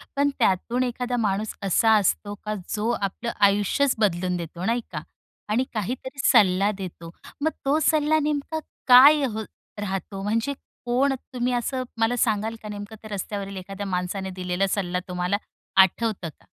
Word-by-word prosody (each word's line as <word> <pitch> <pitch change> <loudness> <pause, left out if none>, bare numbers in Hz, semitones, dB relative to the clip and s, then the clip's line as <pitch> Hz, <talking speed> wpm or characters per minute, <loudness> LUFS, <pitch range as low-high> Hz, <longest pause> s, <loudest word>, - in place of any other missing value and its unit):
पण 285 +1 +3
त्यातून 230 +4 +2
एखादा 245 0 -2
माणूस 210 -1 0
असा 210 +4 +3
असतो 205 +1 0
का 215 - -1 0.2
जो 215 +2 -1
आपलं 200 +4 -2 0.2
आयुष्यच 205 +7 +2
बदलून 180 -3 +1
देतो, 170 +1 -6
नाही 235 +3 +1
का? - - -4 0.5
आणि 230 +5 +2
काहीतरी 255 +5 -4
सल्ला 200 -4 +5
देतो. 170 -3 -7 0.3
मग 315 +2 +2
तो 285 +3 +3
सल्ला 310 0 +3
नेमका 300 +1 -1 0.3
काय 275 +4 +9
अहं 220 -3 -3 0.4
राहतो? 195 0 -4
म्हणजे, 225 +7 0 0.3
कोण 260 +3 +2 0.2
तुम्ही? 250 0 0
असं 255 +2 -1 0.2
मला 225 +2 +2
सांगाल 220 0 +1
का? 210 - -7
नेमकं 205 +1 -7
त्या 215 -1 -8
रस्त्यावरील 200 0 -4
एखाद्या 195 +2 -6
माणसाने 185 +1 -2
दिलेला 185 +1 -1
सल्ला 180 -2 -1
तुम्हाला 180 +2 -1 0.4
आठवतं 190 -2 +1
का? - - -25
210 Hz, 150 wpm, -25 LUFS, 190-245 Hz, 0.5 s, काय